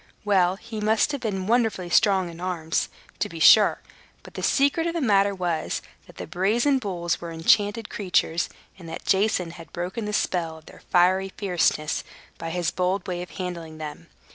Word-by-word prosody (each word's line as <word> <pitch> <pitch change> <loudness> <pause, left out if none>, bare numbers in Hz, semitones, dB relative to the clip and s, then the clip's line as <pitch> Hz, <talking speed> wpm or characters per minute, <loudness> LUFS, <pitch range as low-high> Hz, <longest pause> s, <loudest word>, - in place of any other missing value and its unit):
Well, 190 -3 +3
he 220 +1 -7
must 220 +6 +2
have 285 -3 -4
been 195 -5 -2
wonderfully 220 -6 +1
strong 195 -1 +4
in 165 - -12
his - - -7
arms, 165 -3 -1 0.3
to - - -1
be - - -8
sure. - - +6 0.4
But - - -13
the - - -6
secret 285 +4 +2
of 335 - -2
the - - 0
matter 200 -6 +3
was, 175 -4 -2 0.2
that - - -16
the - - -5
brazen 225 - +1
bulls 175 -6 -2
were 170 - -6
enchanted 205 +7 +2
creatures, 180 -4 0 0.3
and 170 -2 -10
that 165 - -7
Jason 190 -3 +1
had 165 -3 -12
broken 185 +6 -4
the 210 - -3
spell 165 -5 -1
of 160 - -17
their - - -15
fiery 185 +2 +3
fierceness 175 -6 0 0.4
by 165 - -4
his 175 -1 -1
bold 185 +1 -1
way 175 -1 -3
of 180 - -7
handling 170 -4 -6
them. 155 -1 -8
185 Hz, 190 wpm, -25 LUFS, 170-210 Hz, 0.4 s, sure